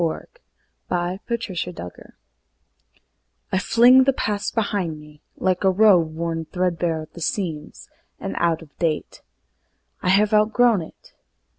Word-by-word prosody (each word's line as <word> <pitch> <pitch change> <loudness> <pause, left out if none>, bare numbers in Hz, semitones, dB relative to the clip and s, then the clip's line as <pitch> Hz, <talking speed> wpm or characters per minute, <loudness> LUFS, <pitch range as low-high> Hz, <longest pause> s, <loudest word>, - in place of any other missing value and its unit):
Ella 165 -2 -2 0.6
Wheeler 180 +1 -2
Wilcox 225 -7 -2
The 180 - -8
Past 90 - -10 1.4
I 190 - +1
FLING 245 +6 +5
the 275 - +3
past 205 -4 -2
behind 195 -8 -1
me, 150 0 -16 0.2
like 185 0 0
a 190 - +5
robe 185 -5 +4
Worn 165 0 -3
threadbare 170 -2 -1
at 155 - -16
the 170 - -10
seams, 165 -3 -4 0.3
and 95 0 -5
out 165 -1 +1
of 150 - -19
date. 160 -3 -2 0.8
I - - -1
have 205 +3 +3
outgrown 220 0 +3
it. 160 - -14
180 Hz, 140 wpm, -22 LUFS, 165-210 Hz, 1.4 s, FLING